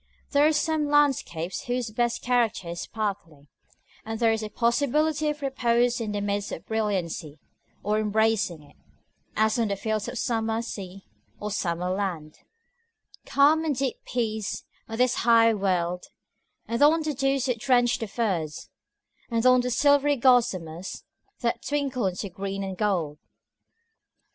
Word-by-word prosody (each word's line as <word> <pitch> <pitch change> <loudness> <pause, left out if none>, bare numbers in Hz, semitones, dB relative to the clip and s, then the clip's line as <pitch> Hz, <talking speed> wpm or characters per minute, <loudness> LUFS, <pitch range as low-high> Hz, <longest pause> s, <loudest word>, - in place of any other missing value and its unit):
There 290 +1 +5
are - - +4
some 310 -1 0
landscapes 270 - +1
whose 245 -2 -2
best 235 +1 -1
character 235 -7 +1
is 170 0 -5
sparkling, 190 -10 -5 0.5
and 225 0 -5
there 230 -1 +4
is 225 0 -1
a 215 - -5
possibility 295 +7 +1
of 300 -1 -4
repose 245 -2 +1
in 215 -2 -3
the 205 - -2
midst 200 0 -2
of - - -7
brilliancy, 185 -8 -2 0.5
or 210 +1 +1
embracing 215 -6 +1
it, 145 - -21 0.6
as 220 +2 +2
on 230 - +2
the 200 - -1
fields 215 +1 -2
of 245 +1 -5
summer 225 0 -1
sea, 195 -4 -8 0.3
or 210 0 -4
summer 180 -2 -1
land: 180 -6 -3 0.9
"Calm, 300 +3 +4
and 305 -3 0
deep 265 -1 -1
peace, 220 -4 -3 0.3
on 225 - -5
this 250 +1 +2
high 230 -1 +5
wold, 180 -3 -1 0.6
And 235 +2 -2
on 315 +2 +5
the 305 -1 -1
dews 270 -1 0
that 250 -4 -1
drench 245 -1 +2
the 225 - -3
furze, 185 -9 -2 0.6
And 230 0 0
on 255 0 +6
the 250 - -2
silvery 285 +3 +3
gossamers, 190 - +1 0.4
That 235 -2 -1
twinkle 275 -6 -1
into 185 +2 -3
green 195 +2 -4
and 190 -1 -4
gold." 175 -7 -1
225 Hz, 150 wpm, -26 LUFS, 195-255 Hz, 0.9 s, on